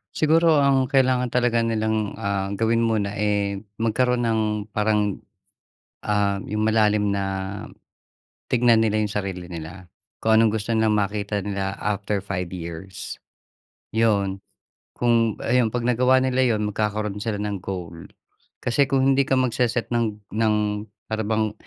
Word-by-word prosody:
Siguro 160 0 +4
ang 135 -2 +3
kailangan 130 -2 +2
talaga 120 -1 +1
nilang, 110 -2 -1
ah, 100 -2 -2
gawin 115 +2 +1
muna 110 -3 0
eh, 100 -1 0 0.2
magkaroon 120 +2 +1
ng 110 -1 +1 0.3
parang, 105 -1 0 0.8
ah, 100 -1 0
yung 105 +1 -1
malalim 105 -2 +2
na 100 -1 -1 1.3
tignan 120 -2 +4
nila 110 -1 +1
yung 105 -1 -1
sarili 95 -3 -4
nila, 85 +2 -8 0.3
kung 110 0 +3
anong 115 -1 +4
gusto 115 +2 -2
nilang 110 -1 +2
makita 105 0 -1
nila 100 -1 -3
after 105 0 -1
5 95 -2 -4
years. 90 +1 -7 0.8
'Yon, 100 -4 +1 0.6
kung 115 -2 +2
ayon 120 0 +3
‘pag 120 +1 -3
nagawa 125 +2 +3
nila 130 0 +1
'yon 105 0 -1
magkakaroon 105 -1 -2
sila 110 -1 -2
ng 100 -2 -3
goal. 90 -3 -6 0.6
Kasi 135 +3 +2
kung 135 -1 +2
hindi 140 +1 +3
ka 135 - +3
magse-set 125 -2 0
ng 115 -3 0 0.2
ng 110 0 +2 0.6
para 110 0 -1
bang 110 0 0
110 Hz, 140 wpm, -23 LUFS, 100-120 Hz, 1.3 s, Siguro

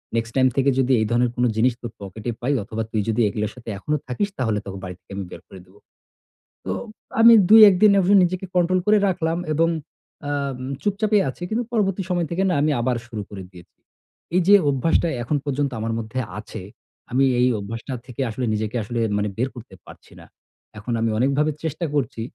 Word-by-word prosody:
"Next 115 0 -2
time 130 -1 +4
থেকে 135 0 +3
যদি 130 0 +2
এই - - +1
ধরনের 120 0 +2
কোন 125 - 0
জিনিস 120 +3 +3
তোর 120 - -6
পকেটে 100 +4 -6
পাই 135 +4 0
অথবা 110 +2 -4
তুই 110 - 0
যদি 115 +2 +1
এগুলোর 105 +1 -2
সাথে 120 -2 -10
এখনো 150 +10 -2
থাকিস 170 +11 -1
তাহলে 110 -4 0
তোকে 95 0 -6
বাড়ি 90 -1 -6
থেকে - - -21
আমি 100 - -4
বের - - -9
করে 95 - -12
দিবো।" 95 +3 -22 0.9
তো - - -2 0.5
আমি 230 +1 +9 0.2
দুই 220 +1 +9
একদিন 200 +2 +5
এভাবে 190 +1 +3
নিজেকে 185 +2 -1
control 180 +1 +3
করে 210 0 +5
রাখলাম 165 -3 -1 0.2
এবং 165 +2 +2 0.6
আম 140 -2 -2 0.2
চুপচাপই 205 0 +1
আছি 155 +7 -8
কিন্তু 230 +3 -1
পরবর্তী 195 -4 +1
সময় 175 -2 0
থেকে 185 +3 0
না - - +1
আমি 150 +1 +2
আবার 125 0 0
শুরু 110 -4 -5
করে 100 -2 -8
দিয়েছি। 90 -2 -16 0.6
এই 185 - +4
যে 200 - +7 0.2
অভ্যাসটা 145 +5 +1 0.2
এখন 145 +5 0
পর্যন্ত 140 0 -1
আমার 115 +1 -2
মধ্যে 115 +3 -4 0.2
আছে 110 0 -8 0.5
আমি 135 +3 +3
এই 125 - +4
অভ্যাসটা 115 +6 -6
থেকে 125 +1 -6
আসলে 125 +3 -3
নিজেকে 110 +2 -3
আসলে 120 +3 -4 0.2
মানে 105 0 -1
বের 125 +3 0
করতে 120 -5 -11
পারছি - - -15
না। - - -14 0.5
এখন 110 +3 -4
আমি 115 - +1
অনেকভাবে 140 +5 +2
চেষ্টা 160 +1 -3
করছি 130 -5 -1
130 Hz, 200 wpm, -22 LUFS, 110-170 Hz, 0.9 s, আমি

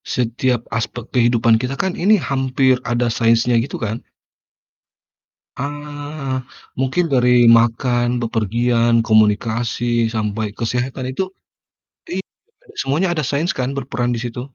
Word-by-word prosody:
setiap 125 +1 0 0.2
aspek 115 +1 -4
kehidupan 120 -2 +3
kita 130 +2 -3
kan 190 - 0
ini 210 +4 +5
hampir 130 -1 +2 0.2
ada 120 0 +1
sainsnya 115 +1 +3
gitu 135 - -6
kan. 110 +2 -3 1.6
Ah, 145 -1 -5 0.3
mungkin 135 +7 0
dari 125 -3 +4
makan, 120 +1 +3
bepergian, 115 +1 +1
komunikasi, 115 +1 +1
sampai 105 -1 -2
kesehatan 125 +3 -3
itu - - +1 0.9
iya, 190 +2 -4 0.4
Kak, - - -18
semuanya 150 +8 0
ada 165 - -1
sains 150 +4 -1
kan 130 +2 -3
berperan 125 -3 -2
di - - -4
situ. 120 0 -5
120 Hz, 120 wpm, -19 LUFS, 115-135 Hz, 1.6 s, ini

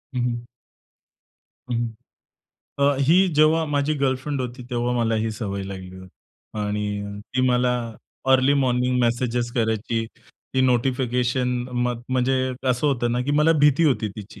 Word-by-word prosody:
हं, 125 - 0
हं. 120 -1 -1 1.3
हं. 120 -1 0 0.9
अ, 140 0 +3
ही 170 +8 +5
जेव्हा 155 +2 +4
माझी 145 +1 0
गर्लफ्रेंड 135 0 -1
होती, 125 0 -5
तेव्हा 120 0 0
मला 115 -2 +1
ही 110 +1 0
सवय 100 -2 -4
लागली 95 -1 -8
होती 95 +3 -14
आणि 105 0 -3
ती 130 - +2
मला 125 0 +2 0.6
अर्ली 130 +2 +4
मॉर्निंग 125 -2 +1
मेसेजेस 120 0 0
करायची. 115 -1 -1 0.5
ती 130 - +3
नोटिफिकेशन 125 0 +1 0.2
म 125 0 0 0.2
म्हणजे 130 0 +1 0.4
असं 125 +4 +1
होतं 120 -4 +1
ना, 125 - 0
की 135 - -2
मला 160 +2 +5
भीती 150 +2 +4
होती 125 -7 +2
तिची. 105 -1 -10
125 Hz, 140 wpm, -23 LUFS, 115-130 Hz, 1.3 s, ही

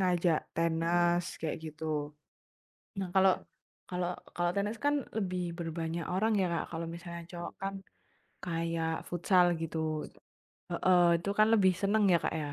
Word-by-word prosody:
ngajak 175 -3 +3 0.2
tenis 170 +1 +2 0.2
kayak 160 -1 -2 0.2
gitu. 150 -1 -3 0.8
Nah, 195 -1 -2
kalau, 190 -1 +6 0.6
kalau, 180 -1 -2 0.2
kalau 175 0 +1
tenis 205 +3 0
kan 290 -2 +1
lebih 180 -5 -2
berbanyak 165 0 -3
orang 210 +5 +1
ya 185 - +2
Kak. 170 -1 -1
Kalau 165 0 -3
misalnya 170 0 -7
cowok 175 -1 -6
kan 195 0 -3 0.7
kayak 165 -2 -2
futsal 175 0 +3
gitu 160 -1 -2 0.7
heeh, 175 -2 +4
itu 200 - -2
kan 215 +1 +6
lebih 190 -4 +5
senang 205 +2 +2
ya - - +7
Kak - - 0
ya 150 -2 -3
175 Hz, 145 wpm, -31 LUFS, 165-185 Hz, 0.8 s, ya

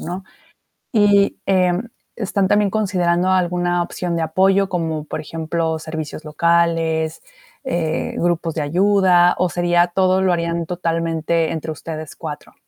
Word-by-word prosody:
¿no? 180 +3 -6 0.7
Y, 205 -3 +3
eh, 185 -2 +3 0.4
¿están 200 -3 0
también 205 -1 +3
considerando 185 -4 +1
alguna 175 -1 +1
opción 175 0 -3
de 165 - -1
apoyo, 190 +4 +2
como 160 -4 -2
por 155 - -5
ejemplo 160 +1 -2
servicios 160 -1 -6
locales, 165 0 +1 0.4
eh, 165 -10 -2
grupos 170 -1 0
de 155 - -2
ayuda, 180 +2 +4
o 180 - +2
sería 175 0 +2
todo 185 +1 +2
lo 185 -1 +3
harían 170 -1 -1
totalmente 165 -1 -1
entre 160 0 -4
ustedes 155 0 -7
4? 150 -2 -8
170 Hz, 135 wpm, -20 LUFS, 160-185 Hz, 0.7 s, ayuda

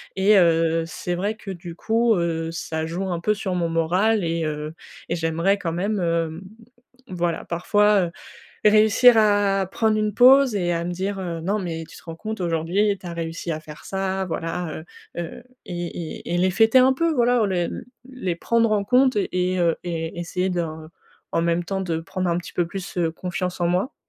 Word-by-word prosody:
Et 200 +2 +5
heu, 165 -2 +3
c'est 175 +1 -4
vrai 205 +5 -2
que, 200 - -8
du 175 -2 -8
coup, 225 +4 +2
heu, 165 -2 -1
ça 160 -1 -4
joue 185 +4 -3
un 170 - -2
peu 210 - +2
sur 195 -3 -3
mon 170 -2 0
moral 180 +6 +2
et 165 0 -1
heu, 150 0 -4 0.4
et 170 - 0
j'aimerais 165 +4 +1
quand 165 -3 -2
même, 200 +4 -1
hem, 165 -1 -1 0.7
voilà 175 -2 -2
parfois, 205 +3 +2
heu, - - -9 0.6
réussir 215 +3 +6
à 205 -2 +3
prendre 220 -1 +2
une 215 0 0
pause 260 0 +6
et 175 -3 0
à 170 0 -1
me 175 - -3
dire, 195 +3 -3
heu: 170 -3 -4
«Non, 200 +5 0
mais 165 -3 -4
tu - - -13
te - - -16
rends 165 -1 -8
compte, 220 +3 -6
aujourd'hui 175 +5 +1
tu 185 - -12
as 170 - -5
réussi 165 0 -4
à 155 - -4
faire 150 -1 -12
ça!» 190 0 -2
voilà, 165 -1 -4 0.3
heu, 175 - -2
heu 170 +8 -8 0.2
et 175 -1 -4 0.4
et 175 - -3
et - - +1
les 185 +1 +3
fêter 225 +5 +3
un 260 +1 +6
peu, 335 +4 +1
voilà. 240 -3 +3
Les 180 -3 0 0.4
les 190 -10 -3
prendre 230 +4 +1
en 205 -1 +1
compte 255 +3 +3
et 185 -2 0
heu, 170 -2 +2
et 165 -1 -4
essayer 180 +2 -2
d'en 160 -3 -4 0.5
même 170 +1 +1
temps 195 +2 -2
de 170 -3 -2
prendre 185 +1 -3
un 170 - +1
petit 175 - -8
peu 175 - +1
plus, 190 +2 -7
heu, 165 -2 +1
confiance 180 +1 -4
en 170 - +2
moi. 185 - 0
180 Hz, 200 wpm, -23 LUFS, 165-205 Hz, 0.7 s, réussir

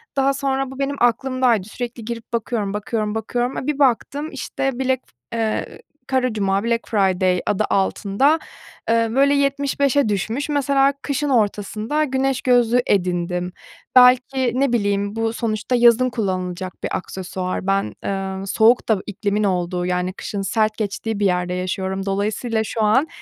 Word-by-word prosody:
Daha 275 0 +2
sonra 270 -1 -1
bu 265 - -10
benim 280 +1 -1
aklımdaydı, 245 -3 +2
sürekli 235 +1 -6
girip 235 0 -7
bakıyorum, 220 -3 -1
bakıyorum, 210 +1 -2
bakıyorum. 240 +3 -2
A, 260 - -4
bir 300 -1 -1
baktım, 280 +3 +1
işte, 270 -2 -3
black 260 -1 +1 0.3
f 230 - -3
eee, 220 - -2 0.3
Kara 260 -1 +1
Cuma-Black 210 +3 0
Friday 185 -4 +2
adı 210 +1 +1
altında, 205 +10 +2 0.5
eee, 230 0 +3
böyle 275 +4 +4
75'e 280 -2 +1
düşmüş. 225 +9 -2
Mesela 280 -1 +2
kışın 290 +1 -1
ortasında 220 +4 0
güneş 265 -2 0
gözlüğü 245 -1 +3
edindim. 180 -1 0 0.4
Belki 255 0 +5
ne 275 -3 +2
bileyim, 205 -2 0
bu 225 0 -1
sonuçta 225 +1 -1
yazın 240 +1 +5
kullanılacak 185 -4 -3
bir - - -1
aksesuar. 185 0 -5
Ben, 195 0 +1
eee, 195 0 -3
soğuk 225 +5 +3
da 215 -3 +3
iklimin 210 +1 -1
olduğu, 180 -2 0
yani, 180 0 -1
kışın 200 +1 -5
sert 215 +2 0
geçtiği 215 0 -3
bir 205 - +1
yerde 180 -1 +1
yaşıyorum. 190 +1 -3
Dolayısıyla 215 +3 -1
şu 220 +1 -3
an, 260 +9 +3
225 Hz, 145 wpm, -21 LUFS, 195-260 Hz, 0.5 s, Belki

